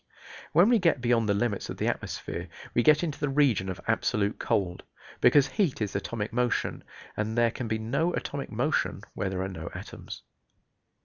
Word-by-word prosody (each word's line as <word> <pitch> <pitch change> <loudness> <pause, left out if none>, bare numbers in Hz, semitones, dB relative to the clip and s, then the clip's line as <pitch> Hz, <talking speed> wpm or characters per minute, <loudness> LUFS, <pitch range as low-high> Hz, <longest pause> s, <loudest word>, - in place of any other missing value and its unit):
When 180 +6 +6
we 240 -2 +5
get 170 -7 +3
beyond 120 -3 +2
the 100 - +3
limits 105 -1 -1
of - - -5
the - - -1
atmosphere - - -3 0.3
we 120 - +3
get 150 +5 +5
into 155 -4 -3
the 145 - 0
region 135 -9 +2
of 95 - -4
absolute 110 -2 +1
cold, 90 -3 0 0.4
because 135 +2 +6
heat 190 - 0
is 105 -3 -2
atomic 105 +2 -3
motion, 125 0 0 0.3
and 110 +2 -2
there 120 -1 +4
can 120 0 -5
be 110 0 0
no 135 +10 0
atomic 140 -1 -4
motion 130 +7 0
where 95 - -2
there 95 0 -2
are - - -2
no 85 -3 -6
atoms. - - -8
115 Hz, 185 wpm, -28 LUFS, 105-145 Hz, 0.4 s, When